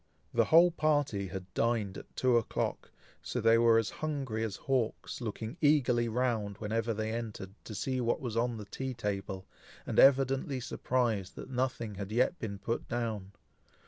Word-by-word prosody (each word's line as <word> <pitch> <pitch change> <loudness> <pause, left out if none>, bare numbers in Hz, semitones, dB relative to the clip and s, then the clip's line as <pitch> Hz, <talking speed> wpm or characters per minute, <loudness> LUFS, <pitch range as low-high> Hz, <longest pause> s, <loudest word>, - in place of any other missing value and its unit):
The - - +4
whole 170 +2 +7
party 145 - +1
had 95 -1 -7
dined 115 -4 0
at - - -11
two 130 -2 +3
o'clock, 115 -2 -1 0.3
so 125 - -3
they 115 0 +5
were 115 -1 +6
as 115 -2 +1
hungry 135 -8 -3
as 110 -4 -2
hawks, 130 -1 -2
looking 110 +4 -5
eagerly 125 -6 +3
round, 110 -4 -1
whenever 115 +2 -1
they 110 0 -2
entered, 110 -5 -5
to 110 - -7
see 130 +5 -1
what 120 -1 +1
was 120 -4 -4
on 120 0 0
the 105 - -7
tea 130 +5 -5
table, 100 -4 -3 0.4
and - - 0
evidently 135 0 +4
surprised 120 -5 -1
that - - -8
nothing 125 -4 -1
had 100 0 -6
yet 125 +9 +2
been 100 -3 -4
put 115 +4 -3
down. 110 -5 -3
115 Hz, 170 wpm, -31 LUFS, 105-130 Hz, 0.4 s, whole